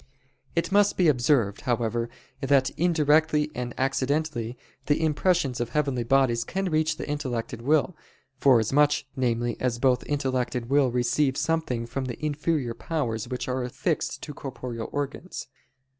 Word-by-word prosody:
It 170 +3 0
must 205 0 +4
be 180 - +4
observed, 125 -6 +2
however, 120 -1 -1 0.3
that 135 -1 +3
indirectly 155 -2 +2
and 125 0 -4
accidentally, 135 -2 -1 0.3
the 145 - +2
impressions 160 -3 +1
of 120 -1 -2
heavenly 135 -3 0
bodies 120 -2 +3
can 190 +3 -2
reach 155 0 +1
the - - -5
intellect 130 -6 -3
and 115 - -6
will, 155 +6 +2 0.4
forasmuch, 135 +3 +4
namely, 120 -2 0
as 125 -2 0
both 125 0 +2
intellect 130 -4 -1
and 120 -2 -2
will 140 -2 +4
receive 125 +3 +1
something 160 -8 -1
from 130 +3 -4
the 130 +4 -5
inferior 150 -4 -1
powers 120 -5 -3
which 125 0 -4
are 130 0 -1
affixed 125 - -2
to 150 - -6
corporeal 125 -4 -6
organs. 145 +5 -4
135 Hz, 145 wpm, -26 LUFS, 120-150 Hz, 0.4 s, must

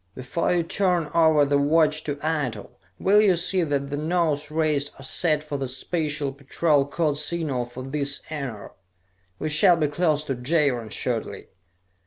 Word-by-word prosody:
Before 130 +6 -2
you 175 -1 +2
turn 175 -3 0
over 160 -3 +4
the 140 0 +2
watch 155 +1 +2
to 145 - -2
Eitel, 140 -10 -2 0.3
will 205 +2 +4
you 200 -4 +4
see 180 +2 0
that 140 -3 -1
the 145 - -2
nose 155 -2 0
rays 150 -2 0
are 135 - -12
set 150 +2 0
for 150 -2 -4
the 135 -1 -3
Special 145 +1 -2
Patrol 140 +1 +1
code 150 -1 -1
signal 150 -5 -1
for 120 +1 -9
this 140 +1 -1
enar. 135 -9 -6 0.7
We 155 - -3
shall 175 +3 +5
be 155 - +1
close 150 0 0
to 140 - -3
Jaron 130 -3 0
shortly." 110 -3 -3
150 Hz, 165 wpm, -24 LUFS, 140-165 Hz, 0.7 s, shall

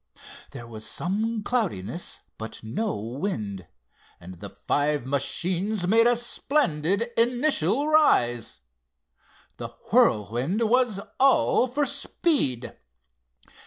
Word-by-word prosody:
There 120 - -9
was 110 -2 -9
some 215 - -2
cloudiness, 180 - -3 0.2
but 110 0 -8
no 200 - -2
wind, 110 - -4 0.5
and 90 0 -11
the - - -8
five 145 -2 -1
machines 180 +8 -1
made 225 +4 +5
a 240 - +4
splendid 235 - 0
initial 245 - +2
rise. 120 - +2 1.0
The - - -5 0.3
Whirlwind 125 - +2
was 240 -3 +2 0.2
all 265 -1 +4
for 285 +4 0
speed. 275 - 0
190 Hz, 95 wpm, -25 LUFS, -, 1.0 s, made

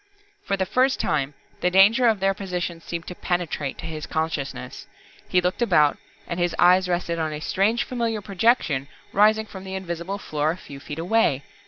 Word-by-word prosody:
For 200 - 0
the 190 - 0
first 260 +6 +2
time, 145 -1 -1 0.2
the 180 - +2
danger 205 +7 +5
of 220 -3 +3
their 195 +1 +2
position 180 -4 -4
seemed 170 +1 -5
to - - -6
penetrate 175 -6 -2
to - - -8
his 155 -2 -5
consciousness. 160 -3 -4 0.4
He 180 - +3
looked 180 +6 -1
about 155 -10 +3 0.3
and 170 - -4
his 175 0 0
eyes 180 +1 +5
rested 175 -1 -1
on 160 -1 -1
a 150 - -4
strange 205 +9 +1
familiar 230 -3 -2
projection 190 - +1 0.3
rising 215 +2 +4
from 190 -3 -10
the 190 0 -6
invisible 180 +1 -4
floor 155 -6 -1
a 165 - -1
few 140 -6 -11
feet 145 +2 -8
away. 165 -6 +2
180 Hz, 185 wpm, -24 LUFS, 160-200 Hz, 0.4 s, danger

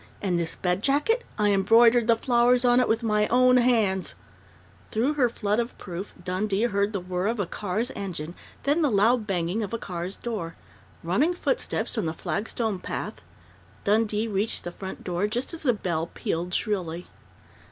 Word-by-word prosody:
And 180 -4 0
this 165 -1 -1
bed 180 +1 -1
jacket? 295 - +2
I 210 -1 +3
embroidered 230 +4 +5
the 230 - +5
flowers 245 +1 +3
on 245 0 +5
it 250 - +3
with 225 +1 +1
my 210 -1 +2
own 250 +1 +5
hands 220 -7 +2 0.4
" - - -28
Through 245 +7 +1
her 265 -5 +2
flood 210 -1 -1
of 235 +1 -3
proof 185 +2 -7
Dundee 195 +3 -1
heard 200 -3 +1
the 200 - -2
whir 180 +1 -2
of 230 0 -1
a 200 - +1
car's 210 +8 -3
engine, 170 -5 -5 0.3
then 290 +4 +2
the 300 - +3
loud 220 +1 +3
banging 180 +2 -1
of 215 +2 -3
a - - -1
car's 180 -2 -5
door.... 205 -9 -4 0.5
Running 260 - +1
footsteps 355 - -1
on 175 - -1
the 160 - -2
flagstone 215 +1 -2
path.... - - -5 0.6
Dundee 215 +1 +1
reached 210 +1 -1
the 175 - -5
front 190 +2 -8
door 180 +3 -1
just 245 +9 -3
as 330 - -6
the 265 - +3
bell 170 -7 -2
pealed 175 +2 -3
shrilly. 180 -5 -2
210 Hz, 180 wpm, -26 LUFS, 185-240 Hz, 0.6 s, embroidered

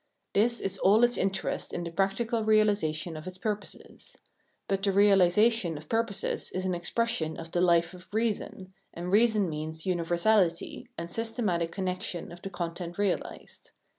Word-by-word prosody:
This 235 +4 +3
is 195 - -2
all 210 +5 +5
its 240 0 +4
interest 195 0 -2
in 175 - -3
the 170 - -5
practical 220 +5 0
realisation 200 -7 +2
of 155 +3 -8
its 185 0 -6
purposes. 210 +1 -6 0.5
But 195 0 0
the 200 - +1
realisa 200 +2 +5
tion 180 -9 -2
of 150 +1 -12
purposes 225 -3 -1
is 185 0 -2
an 185 - 0
expression 175 -2 -1
of 165 0 -8
the 175 - +1
life 170 -1 +3
of 180 +2 -14
reason, 210 -4 -2 0.2
and 175 +2 -4
reason 215 -1 +4
means 160 0 -5
universality 175 +1 +1
and 170 +1 -6
systematic 210 -7 -1
connection 185 -2 -3
of 175 0 -11
the 195 - -5
content 175 -1 -5
realised. 200 -3 -3
185 Hz, 160 wpm, -28 LUFS, 170-210 Hz, 0.5 s, all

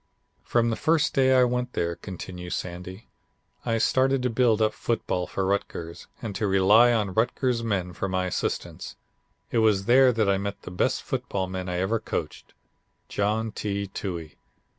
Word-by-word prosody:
"From 115 -1 +1
the - - 0
first 160 +4 +2
day 130 -1 +4
I 130 - +6
went 125 0 -1
there," 85 0 -1
continues 90 -1 -6
Sandy, 90 +3 -7 0.5
"I 115 -2 0
started 130 +3 +2
to 125 - +1
build 115 -2 +3
up 110 -1 +2
football 100 -7 -2
for 95 - -2
Rutgers 95 -4 -3 0.2
and 110 -3 -3
to 105 +1 -1
rely 100 +5 +6
on 105 -5 0
Rutgers 120 +2 +1
men 95 -5 -1
for 100 +2 -3
my 95 0 0
assistants. 90 - -3 0.6
It 115 - +2
was 105 -3 +3
there 130 +2 +6
that 110 -3 +1
I 100 -1 +2
met 100 0 -5
the - - -8
best 90 - 0
football 95 -1 -2
man 95 0 -5
I 90 - -2
ever 95 +5 0
coached, - - -5 0.5
John 110 +2 0
T. 100 -1 -3
Toohey. 85 -5 -6
105 Hz, 170 wpm, -26 LUFS, 95-120 Hz, 0.6 s, I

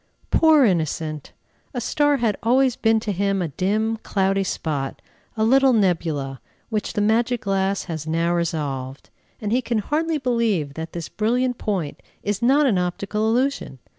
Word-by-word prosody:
Poor 315 -4 +5
innocent! 155 -5 -1 0.4
a - - 0
star 290 +4 +2
had 230 -5 +1
always 255 +2 +3
been 225 0 +2
to 215 -1 -3
him 195 +1 0
a 175 -3 -1
dim, 215 +8 0
cloudy 195 -2 0
spot, 145 -7 -3 0.4
a 220 - +1
little 265 +3 +5
nebula, 160 - 0 0.3
which 215 -2 -2
the 210 - 0
magic 230 +3 +2
glass 195 0 0
has 160 -3 -6
now 165 +2 +1
resolved; 145 -6 -3 0.3
and 210 -1 -3
he 250 +3 +2
can 240 -2 -1
hardly 310 +9 0
believe 230 - 0
that 160 +2 -7
this 170 -2 -5
brilliant 245 +3 0
point 185 -9 -3 0.2
is 205 +1 -2
not 275 +5 +4
an 215 -9 +2
optical 200 +4 -1
illusion. 250 - 0
205 Hz, 160 wpm, -22 LUFS, 170-240 Hz, 0.4 s, Poor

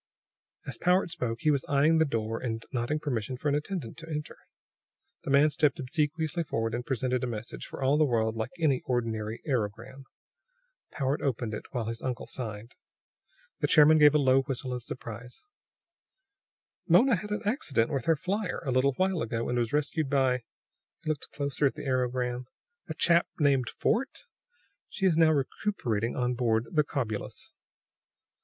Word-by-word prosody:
As - - -5
Powart 180 0 +2
spoke, 125 -9 -3
he 155 - +3
was 140 -3 +1
eyeing 150 +3 +4
the 160 - +5
door 115 -4 -2
and 115 -2 -4
nodding 125 +5 -1
permission 130 -5 -3
for 145 - -1
an - - +1
attendant 150 - -3
to 165 0 -10
enter. 150 -1 -4 0.9
The - - -5
man 140 +2 +5
stepped 145 -2 +2
obsequiously 155 +4 -1
forward 115 -7 -2
and 120 +1 -2
presented 130 -1 -1
a - - 0
message, 115 -1 -6
for - - -6
all 140 +3 +3
the - - +6
world 115 -5 +1
like 110 -1 -2
any 150 -6 +2
ordinary 115 -3 -2
aerogram. 125 +1 -3 0.9
Powart 135 0 -1
opened 120 -4 -1
it 105 - -5
while 120 -3 -3
his 115 +1 -4
uncle 125 -3 -3
signed. 110 -1 -5 0.9
The - - +1
chairman 155 0 +6
gave 150 0 +7
a - - +7
low 135 -2 +4
whistle 130 -1 -4
of 125 - -4
surprise. 120 0 -8 1.4
"Mona 225 +9 +6
had 210 +4 -7
an 210 +2 -2
accident 155 - +1
with 135 -5 -2
her 165 - +4
flier, 185 +6 -3
a 135 - 0
little 130 +2 +3
while 185 +3 0
ago, 115 0 -2
and 120 0 +1
was 120 0 -1
rescued 150 0 0
by 130 -2 +2 0.3
" - - -50
he 160 - -3
looked 150 - -4
closer 140 0 0
at - - -3
the - - -7
aerogram 125 -1 -1 0.4
"a - - -4
chap 170 0 +3
named 135 -5 +3
Fort. 250 +5 -1 0.6
She 195 - -2
is 180 -4 +4
now 160 -1 +5
recuperating 130 - -1
on 125 0 0
board 115 -2 +1
the 155 -3 +3
Cobulus." 120 -8 -4
135 Hz, 175 wpm, -29 LUFS, 120-155 Hz, 1.4 s, gave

